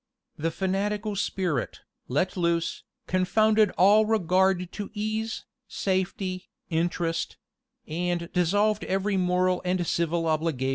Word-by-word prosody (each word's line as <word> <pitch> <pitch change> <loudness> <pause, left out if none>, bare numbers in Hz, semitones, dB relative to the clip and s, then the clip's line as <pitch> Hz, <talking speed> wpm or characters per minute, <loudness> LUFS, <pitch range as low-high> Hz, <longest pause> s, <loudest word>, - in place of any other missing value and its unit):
The 160 +2 -1
fanatical 200 +4 -1
spirit, 180 -8 -2 0.3
let 150 +8 0
loose, 170 -2 0 0.2
confounded 215 +4 +3
all 210 +4 +6
regard 185 -3 +2
to 205 -1 -6
ease, 215 +1 -3 0.2
safety, 185 -1 -2 0.2
interest; 165 0 -1 0.5
and 175 +1 -2
dissolved 205 +4 +2
every 195 +2 0
moral 180 0 +2
and 180 -1 0
civil 170 0 0
obligation. 155 -4 0
185 Hz, 105 wpm, -27 LUFS, 170-205 Hz, 0.5 s, all